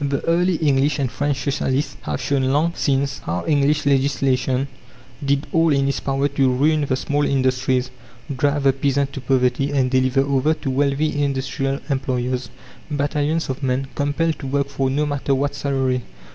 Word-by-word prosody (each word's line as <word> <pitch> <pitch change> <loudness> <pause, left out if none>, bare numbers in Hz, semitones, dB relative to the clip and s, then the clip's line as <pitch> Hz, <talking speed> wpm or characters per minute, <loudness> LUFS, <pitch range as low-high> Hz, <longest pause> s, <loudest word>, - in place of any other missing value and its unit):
The 140 -1 -1
early 175 +2 +2
English 145 -2 +2
and 135 -4 -1
French 145 +3 -1
Socialists 140 0 -1
have 75 -1 -3
shown 140 -2 0
long 150 +6 +1
since 140 0 0
how 85 +2 -3
English 145 -1 +2
legislation 135 -1 +1 0.6
did 140 +1 +1
all 165 -1 +3
in 135 -1 +2
its 140 - -1
power 135 +1 0
to 140 -2 +1
ruin 150 +4 +2
the 130 - +2
small 145 +2 -1
industries, 130 -2 +1 0.4
drive 145 +2 +1
the 135 -1 +4
peasant 140 +1 0
to 135 - -6
poverty, 125 +1 +1
and 135 -3 +1
deliver 130 +1 +3
over 140 +3 +1
to 135 -4 -4
wealthy 145 +2 +1
industrial 135 0 -1
employers 130 -3 -2 0.4
battalions 145 +2 0
of 130 +1 -4
men, 135 0 -1
compelled 145 +2 0
to 135 - -6
work 140 +1 0
for 135 -1 -1
no 145 +3 0
matter 145 -1 0
what 140 +1 -1
salary. 135 -3 0
140 Hz, 170 wpm, -21 LUFS, 130-145 Hz, 0.6 s, the